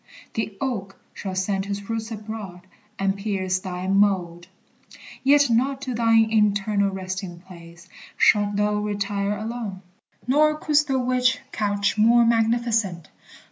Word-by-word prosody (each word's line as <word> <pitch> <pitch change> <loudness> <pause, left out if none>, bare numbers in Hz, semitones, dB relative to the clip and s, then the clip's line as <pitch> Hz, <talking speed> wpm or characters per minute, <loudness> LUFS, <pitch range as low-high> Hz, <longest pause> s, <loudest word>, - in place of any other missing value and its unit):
The 220 -2 -3
oak 205 -8 -4
Shall 190 -2 -6
send 195 +1 -1
his 200 0 -5
roots 225 0 -3
abroad, 210 -4 -7 0.4
and 195 0 0
pierce 195 -2 -2
thy 185 -1 -5
mold. 190 -3 +1 0.8
Yet 285 +1 +5
not 265 +4 +1
to 255 - -3
thine 225 -1 +3
eternal 205 -1 +2
resting 185 -2 -5
place 170 -1 -14 0.3
Shalt 205 -1 +3
thou 210 0 +1
retire 205 0 -2
alone, 215 -3 -5 0.4
nor 305 +4 +3
couldst 300 -1 +2
thou 270 -2 +1
wish 255 0 +2
Couch 205 0 -1
more 235 +2 +5
magnificent. 225 -6 +1
205 Hz, 130 wpm, -23 LUFS, 195-230 Hz, 0.8 s, Yet